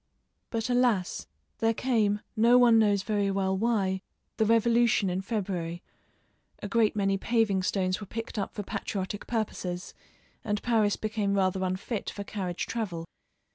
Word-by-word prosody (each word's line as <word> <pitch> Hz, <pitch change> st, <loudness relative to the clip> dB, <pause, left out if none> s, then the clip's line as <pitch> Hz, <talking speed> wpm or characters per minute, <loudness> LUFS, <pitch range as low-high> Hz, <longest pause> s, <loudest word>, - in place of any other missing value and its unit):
But 225 Hz, -1 st, -2 dB
alas! 245 Hz, -7 st, +1 dB, 0.3 s
there 225 Hz, 0 st, +2 dB
came, 215 Hz, -5 st, +1 dB
no 235 Hz, +2 st, +5 dB
one 235 Hz, -2 st, +6 dB
knows 205 Hz, -3 st, +3 dB
very 205 Hz, -2 st, 0 dB
well 190 Hz, -1 st, 0 dB
why, 195 Hz, -3 st, 0 dB, 0.4 s
the 220 Hz, -, +2 dB
Revolution 230 Hz, -3 st, +3 dB
in 185 Hz, +1 st, -1 dB
February; 185 Hz, -5 st, -3 dB, 0.7 s
a -, -, -6 dB
great 215 Hz, +1 st, +2 dB
many 195 Hz, -1 st, +1 dB
paving 220 Hz, -4 st, +2 dB
stones 185 Hz, +1 st, 0 dB
were 205 Hz, -, -7 dB
picked 225 Hz, 0 st, -5 dB
up 200 Hz, -, -4 dB
for 205 Hz, -, -3 dB
patriotic 200 Hz, 0 st, -4 dB
purposes, 185 Hz, -6 st, -3 dB, 0.5 s
and 210 Hz, -1 st, -1 dB
Paris 220 Hz, -4 st, +2 dB
became 210 Hz, -2 st, -1 dB
rather 190 Hz, -1 st, +1 dB
unfit 190 Hz, +4 st, -2 dB
for 200 Hz, -, -6 dB
carriage 185 Hz, -4 st, -3 dB
travel. 185 Hz, -8 st, -3 dB
205 Hz, 145 wpm, -28 LUFS, 190-225 Hz, 0.7 s, one